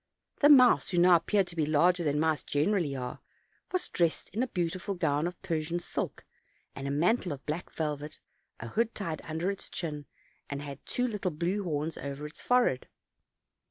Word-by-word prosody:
The 290 - +6
mouse, 255 -4 +7
who 180 - -1
now 175 +1 +7
appeared 195 +4 +1
to 175 - -8
be 155 -3 +1
larger 175 +4 +3
than 150 -1 +1
mice 155 -3 +2
generally 150 -1 0
are, 125 -1 -5 0.5
was 370 - -1
dressed 170 -2 0
in 215 +6 -1
a 260 - +1
beautiful 180 0 -2
gown 150 -2 +1
of 175 - -7
Persian 165 -2 -1
silk, - - -4 0.5
and 135 0 -5
a - - -1
mantle 175 +7 +2
of 140 -1 -7
black 155 +4 -3
vel 150 -2 -2
vet, 150 +1 -8 0.4
a 115 - -6
hood 230 - 0
tied 165 -6 -3
under 165 +4 -1
its 195 - -8
chin, 150 -4 -4 0.4
and 140 - -3
had 140 -1 -8
two 250 0 0
little 210 -5 -2
blue 175 +5 -1
horns 155 -2 -2
over 140 +1 -5
its 150 - -9
forehead. 245 - +2
165 Hz, 190 wpm, -30 LUFS, 150-190 Hz, 0.5 s, mouse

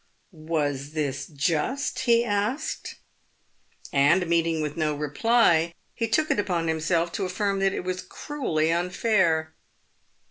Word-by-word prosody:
" - - -42 0.2
Was 145 -2 -1
this 145 -3 -2
just 165 - -1
?" 255 - -3
he 235 0 +5
asked; 210 +6 -2 1.0
and 145 +7 +4
meeting 165 -1 +1
with 150 -1 -3
no 155 -2 0
reply, 170 - +2 0.2
he 230 - -2
took 305 +8 +1
upon 180 -5 0
himself 165 +2 0
to 200 0 -2
affirm 195 +2 -1
that 195 0 +2
it - - -3
was 185 0 -3
cruelly 165 - -2
unfair. 175 -3 +1
170 Hz, 135 wpm, -25 LUFS, 155-205 Hz, 1.0 s, he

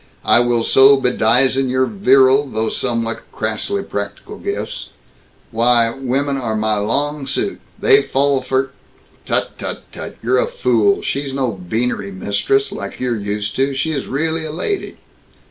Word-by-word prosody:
I - - +6
will 120 -1 +1
so 135 +3 +6
bedizen 130 +1 +2
your 130 +1 +2
virile, 135 -7 +4
though 110 -3 -2
somewhat 115 -1 -2
crassly 110 - -2
practical 100 - -6
gifts - - -5 0.6
Why, 115 0 +3
women 135 +1 -1
are 115 -4 -2
my 110 0 0
long 140 +7 -1
suit. 390 - -2 0.2
They 425 -2 +5
fall 140 - +1
for 130 +1 -1 0.3
" - - -32
"Tut, - - -1
tut, - - -5
tut! - - -8
You're - - +2
a - - +1
fool. 410 -4 +1
She's 140 - -3
no 130 -3 0
beanery 100 +2 -2
mistress, 100 - 0
like - - -7
you're 125 -2 -1
used 105 0 -3
to. 135 +1 +1
She 160 +4 -1
really 160 +4 -2
is 160 - -4
a - - -5
lady." 390 - -3
130 Hz, 155 wpm, -18 LUFS, 115-145 Hz, 0.6 s, I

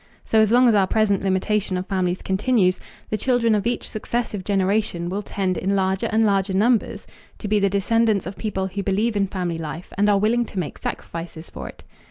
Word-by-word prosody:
So 220 - +3
as 220 -1 +4
long 250 +1 +6
as 235 - +5
our 195 -2 +3
present 210 -2 +2
limitation 195 0 0
of 180 - -3
families 185 -2 -1
continues, 190 -2 +2 0.3
the 215 - -1
children 245 -3 +2
of 210 +1 +1
each 240 - -2
successive 215 -2 -3
generation 195 -2 0
will 195 +3 -2
tend 190 -2 -2
in 195 +2 0
larger 190 0 0
and 220 +1 +3
larger 195 -2 +1
numbers 225 +3 +1 0.3
to 215 - -6
be 210 0 +2
the 200 0 +2
descendants 210 +1 +1
of 185 +3 -6
people 190 -3 -3
who 190 +1 -4
believe 205 +4 0
in 200 -1 +1
family 180 -3 -3
life 160 +2 -7
and 205 +1 +4
are 205 - +4
willing 230 +4 +2
to 205 - -11
make 175 -5 -3
sacrifices 165 -1 -6
for - - -7
it. - - -14
200 Hz, 210 wpm, -22 LUFS, 190-220 Hz, 0.3 s, long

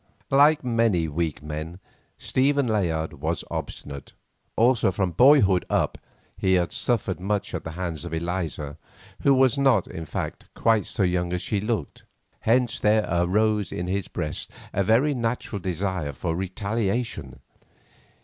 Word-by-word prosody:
Like 145 +2 +5
many 115 -9 +2
weak 80 -1 -2
men, 80 +3 -5 0.4
Stephen 140 +1 +1
Layard 85 -9 0
was 80 +3 -1
obstinate, 70 -1 -6 0.4
also 115 -3 +3
from 95 -1 -1
boyhood 100 - +5
up - - 0 0.4
he 95 -1 +1
had 90 -1 +1
suffered 105 -7 0
much 100 +2 -2
at - - -3
the 80 - -6
hands 85 -3 -4
of 85 - -6
Eliza, 80 -3 -3 0.4
who 140 - +4
was 130 0 +4
not, 130 -9 +4
in 80 -1 -7
fact, - - -4
quite 110 -2 +2
so 105 - 0
young 90 -1 0
as 90 0 -2
she 100 +1 -1
looked. 105 -8 -3 0.4
Hence 120 +1 +2
there 105 0 +3
arose 105 +4 +1
in 90 - -3
his 95 +1 -2
breast 75 -3 -4 0.2
a 100 - +1
very 125 +9 +3
natural 115 -3 -2
desire 90 -4 -2
for 80 +4 -3
retaliation. 100 - -2
95 Hz, 145 wpm, -25 LUFS, 85-115 Hz, 0.4 s, Like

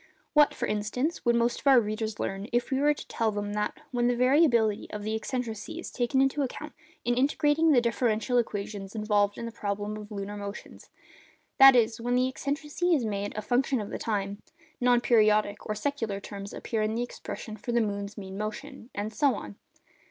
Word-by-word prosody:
What, 295 -1 +5
for - - -2
instance, 230 +10 -2
would 235 0 +4
most 235 +1 +1
of - - -6
our 265 -2 +8
readers 215 -1 -3
learn 195 +2 -3
if 240 +2 0
we 265 - +1
were 295 +1 +3
to - - -10
tell 225 -2 0
them 205 0 -3
that, 210 0 -2
'when 240 -1 +1
the 245 - +2
variability 245 -5 +3
of 210 -1 -6
the 215 +1 -2
eccentricity 225 +2 -4
is 345 - -6
taken 260 +2 +1
into 270 +2 +2
account, 290 +3 -4 0.3
in 240 - +2
integrating 295 +5 +3
the 250 -4 +5
differential 235 +1 +1
equations 205 -2 -4
involved 210 -1 +1
in 235 - -5
the 230 - -5
problem 205 0 -3
of 210 -1 -9
the 210 - -8
lunar 200 +1 -5
motions—that 210 +5 +1
is, 230 -1 +2
when 245 +1 0
the 255 +1 +3
eccentricity 295 +6 -1
is 255 -6 0
made 205 -1 -3
a 215 - -3
function 255 +2 +1
of 205 - -5
the - - -4
time—non 240 +6 -1
periodic 215 -3 +3
or 215 - 0
secular 225 -4 -2
terms 200 0 -8
appear 225 -2 -3
in 215 +1 0
the 240 - 0
expression 225 -2 -7
for 220 +3 -5
the 235 - +3
moon's 200 -1 -3
mean 195 -1 -7
motion'—and 215 0 -5
so 280 +3 +2
on? 100 -1 -8
225 Hz, 195 wpm, -28 LUFS, 210-255 Hz, 0.3 s, our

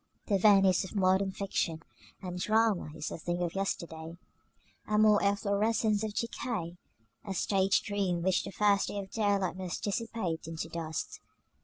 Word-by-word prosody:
The 200 -3 +1
Venice 195 -2 +5
of 190 - -9
modern 190 0 +3
fiction 170 -5 -2 0.4
and 180 -1 -5
drama 215 -4 +2
is - - -5
a - - -6
thing 175 +2 -2
of 170 - -2
yesterday, 170 -4 -4 0.7
a 210 - +1
mere 210 -1 +5
efflorescence 205 +1 +1
of 215 -1 -4
decay, 185 -7 -3 0.4
a 195 -2 -5
stage 195 +1 +2
dream 190 -4 -1
which 190 0 +2
the 195 - -6
first 205 0 +2
ray - - -5
of 195 -1 -6
daylight 200 -4 0
must 185 -2 -5
dissipate 205 -6 -2
into 165 0 -5
dust. 160 -1 -4
195 Hz, 155 wpm, -30 LUFS, 175-210 Hz, 0.7 s, Venice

